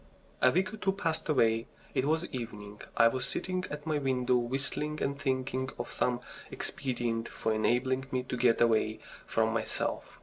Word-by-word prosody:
A 130 - +7
week 185 +8 +1
or - - -5
two 195 -2 +1
passed 165 -5 -1
away. 115 -5 +3 0.3
It 130 - +1
was 160 +3 +2
evening. 105 -4 -6 0.2
I 115 - +8
was 130 +2 0
sitting 185 0 -2
at 150 0 -6
my 155 -2 +1
window 130 -2 +2
whistling 135 +5 -1
and 140 0 -1
thinking 130 -1 0
of - - -4
some 125 -1 0 0.3
expedient 120 -3 -2
for 110 - -1
enabling 130 +4 +1
me 130 -1 0
to 125 - -4
get 120 -1 +4
away 110 -2 +3 0.3
from - - +2
myself. - - -2
130 Hz, 170 wpm, -31 LUFS, 120-150 Hz, 0.3 s, I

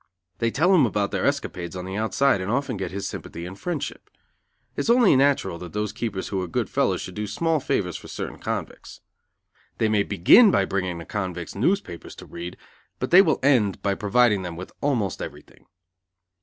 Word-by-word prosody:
They 115 - +1
tell 170 +10 +3
him 155 -9 +5
about 100 -1 -1
their - - 0
escapades 85 0 -3
on 90 0 -5
the 95 +1 -5
outside 110 +1 +2
and 95 - -4
often 130 +1 -1
get 95 -1 -4
his 100 0 -4
sympathy 85 +1 -7
and 90 +2 -7
friendship. 170 - -5 0.7
It - - -5
is - - -3
only 235 - +6
natural 130 -10 +2
that 90 -1 -9
those 105 0 -2
keepers 105 -5 -4
who 95 -2 -1
are 90 - -3
good 85 - -2
fellows - - +1
should 95 - -7
do 105 +2 -4
small 165 +8 0
favors 90 - -1
for - - -12
certain - - -6
convicts. - - -5 0.8
They 110 - +1
may 105 -1 +3
begin 100 - +6
by 100 - +3
bringing 95 -3 -2
the 85 - -8
convicts 90 -5 -4
newspapers 130 - -2
to - - -11
read, 85 +1 -8 0.4
but - - -4
they 180 +2 +9
will 155 -7 +2
end 120 -9 +2
by 100 - +1
providing 105 +1 +2
them 90 -2 -6
with 90 +2 -8
almost 125 -9 0
everything. - - -10
105 Hz, 195 wpm, -24 LUFS, 95-135 Hz, 0.8 s, they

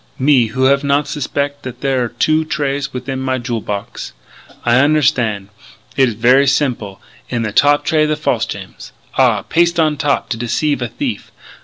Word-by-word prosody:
Me 130 -3 +3
who 130 +4 -2
have 140 +2 +3
not 140 +1 +1
suspec' 145 0 -3
that 125 -1 -8
there 135 -3 +1
are - - -1
two 155 +5 +1
trays 145 -2 -2
within 130 +1 -5
my 130 0 -1
jewel 120 -2 -3
box!... 100 -11 -6 0.5
I 120 - +3
unnerstan'. 130 -8 +2 0.5
It 135 -2 +3
is 115 - -6
ver' 125 +5 +4
simple. 120 -8 -1 0.3
In 120 -2 -2
the 110 - -2
top 145 +4 +3
tray 155 -1 +2
the 155 - 0
false 130 -7 -1
gems. 95 -1 -9 0.2
Ah! - - +3
Paste 170 0 +1
on 155 -2 +2
top 145 0 0
to 115 - -2
deceive 140 +5 -1
a 120 - -1
thief!... - - -5
135 Hz, 180 wpm, -17 LUFS, 120-145 Hz, 0.5 s, ver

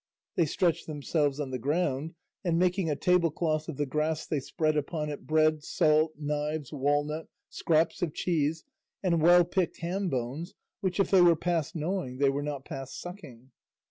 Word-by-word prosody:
They 170 -3 +2
stretched 170 +2 0
themselves 150 -1 -1
on 140 -3 -3
the 130 - -3
ground, 150 +2 -1 0.3
and 170 -3 +1
making 180 0 +2
a 150 - +1
tablecloth 165 -2 +1
of 150 - -5
the 145 - 0
grass 155 +3 -1
they 150 - -1
spread 155 +3 -1
upon 150 +1 -2
it 145 - -8
bread, 155 -1 +3
salt, 155 -1 +2
knives, 150 0 -3
walnut, 145 +3 0 0.2
scraps 160 0 +1
of 175 -3 0
cheese, 160 -2 0 0.4
and 170 -4 +2
well 175 +2 +7
picked 175 -1 -1
ham 185 +3 -1
bones 135 +6 -4 0.2
which 190 -2 -2
if 195 - +2
they 190 -2 +7
were 175 -1 +7
past 165 -2 -1
gnawing 160 -5 -2 0.2
were 140 - -1
not 145 -2 -4
past 135 -4 -7
sucking. 145 - -10
155 Hz, 170 wpm, -29 LUFS, 145-170 Hz, 0.4 s, well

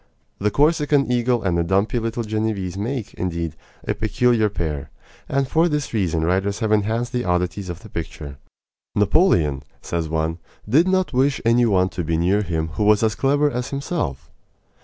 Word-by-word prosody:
The 105 - +1
Corsican 145 0 +2
eagle 120 -1 +1
and 95 -3 +1
the 85 - +2
dumpy 100 +7 +1
little 115 +1 -2
Genevese 110 -4 -2
make, 115 +3 -4
indeed, 85 -3 -3 0.3
a - - +1
peculiar 110 +1 +2
pair; 80 -6 -4 0.4
and 135 0 +1
for 165 +5 +3
this 150 -4 -2
reason 85 -7 0
writers 95 +4 0
have 110 -2 -1
enhanced 110 +3 +1
the 125 0 0
oddities 90 +2 -1
of 85 +1 -6
the 110 - -11
picture. 75 -5 -7 0.6
"Napoleon," 95 - +3 0.2
says 85 -2 -2
one, 80 +1 -1 0.3
"did 150 - +4
not 185 -4 +1
wish 135 +2 +2
any 120 +1 +4
one 95 -3 +2
to 90 -2 -4
be 80 0 0
near 95 +5 +2
him 80 -4 -2
who 80 +6 -2
was 105 +1 +4
as 110 -1 +2
clever 145 +4 +2
as 125 0 -3
himself." 135 - -3
105 Hz, 175 wpm, -22 LUFS, 85-125 Hz, 0.6 s, did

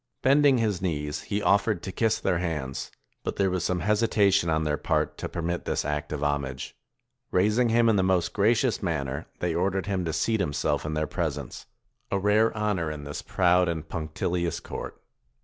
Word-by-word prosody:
Bending 140 0 +5
his 105 -6 0
knees, 75 -4 -2
he 105 0 -3
offered 100 +2 +2
to 95 - -4
kiss 110 +3 +1
their 90 -3 0
hands; 75 -7 -3 0.3
but - - -3
there 95 -2 +1
was 90 -2 -1
some 90 -1 0
hesitation 105 -4 +3
on 80 0 +1
their 75 -1 +1
part 65 - 0
to - - -4
permit 85 0 -3
this - - -1
act 75 +2 -2
of 75 -1 -3
homage. 70 -3 -2 0.5
Raising 105 +6 +3
him 115 +1 +4
in 110 -2 +4
the 95 - +3
most 95 -2 +1
gracious 115 +4 +2
man 80 -8 -1
ner, 65 +2 -5
they 90 -2 0
ordered 95 +2 0
him 95 -3 -1
to 80 - -1
seat 110 +8 0
himself 75 -3 0
in 75 - -2
their 75 0 0
presence; 75 -6 -4 0.4
a 100 - 0
rare 105 +3 +3
honor 105 -6 0
in 75 -1 -6
this 75 0 -5
proud 90 -1 +3
and 80 -2 -3
punctilious 85 +1 -2
court. - - -7
90 Hz, 190 wpm, -27 LUFS, 80-105 Hz, 0.5 s, Bending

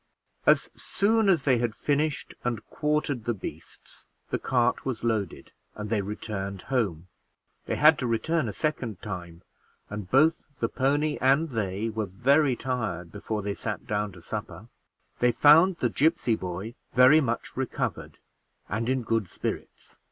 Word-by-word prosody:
As - - +4
soon 220 +1 +1
as 170 -7 +3
they 130 -4 +3
had 115 -2 -1
finished 150 0 -1
and 115 -3 -2
quartered 150 -5 -1
the 120 - 0
beasts, 95 - -10 0.3
the - - 0
cart 125 -1 +1
was 130 -5 -4
loaded 110 -6 -2 0.2
and 105 0 -6
they 110 -3 +2
returned 100 -1 -5
home; 95 -9 0 0.6
they - - 0
had 155 0 +6
to 125 - -1
return 130 +4 0
a - - -3
second 120 - -3
time, 90 -4 -7 0.5
and 100 -3 -6
both 155 +5 +3
the 115 - 0
pony 145 +3 0
and 140 +5 +3
they 105 -3 -2
were 110 -2 -2
very 130 - +3
tired 110 -10 -3
before 105 0 -4
they 100 0 -2
sat 105 0 -5
down 105 0 -1
to 85 -2 -14
supper - - -6 0.5
They 120 0 +4
found 160 +9 +6
the 120 - +1
gipsy 150 -6 +2
boy 95 +4 -5 0.2
very 130 +5 +7
much 120 -4 -3
recovered 130 -1 -3 0.5
and 115 +4 -2
in 130 -1 0
good 115 -3 0
spirits. - - -6
120 Hz, 155 wpm, -27 LUFS, 105-140 Hz, 0.6 s, very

